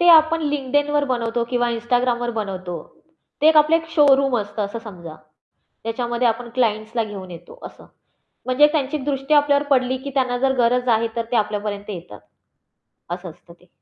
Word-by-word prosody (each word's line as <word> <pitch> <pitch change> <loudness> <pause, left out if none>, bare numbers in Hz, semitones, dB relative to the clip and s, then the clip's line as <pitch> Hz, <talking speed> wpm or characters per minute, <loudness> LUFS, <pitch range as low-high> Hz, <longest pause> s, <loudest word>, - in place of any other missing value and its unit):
ते 350 - +4
आपण 320 +1 +4
LinkedInवर 290 +1 0
बनवतो 240 -3 -1
किंवा 240 0 0
Instagramवर 240 +1 0
बनवतो. 185 -5 -4 0.6
ते 310 - +6
आपलं 310 +2 +3
एक 325 -1 -5
शोरूम 275 -4 +4
असतं 205 +1 -4
असं 205 +3 -5
समजा. 170 -6 -9 0.7
त्याच्यामध्ये 240 +2 -1
आपण 235 +1 -2
क्लायंट्सला 225 -1 0
घेऊन 195 -3 -8
येतो 180 - -12
असं. - - -13 0.6
म्हणजे 255 +4 +5
त्यांची 295 -2 0
एक 280 - -6
दृष्टी 275 +1 0
आपल्यावर 290 0 +3
पडली, 260 -1 +2
की 280 +2 -7
त्यांना 255 -2 +1
जर 265 +1 +2
गरज 250 +1 +2
आहे, 230 0 +2
तर 230 - -1
ते - - +3
आपल्यापर्यंत 210 -1 -2
येतात. 170 - -9 0.9
असं 175 0 -5
असतं 170 +1 -17
ते. 180 - -24
245 Hz, 165 wpm, -21 LUFS, 215-275 Hz, 0.9 s, ते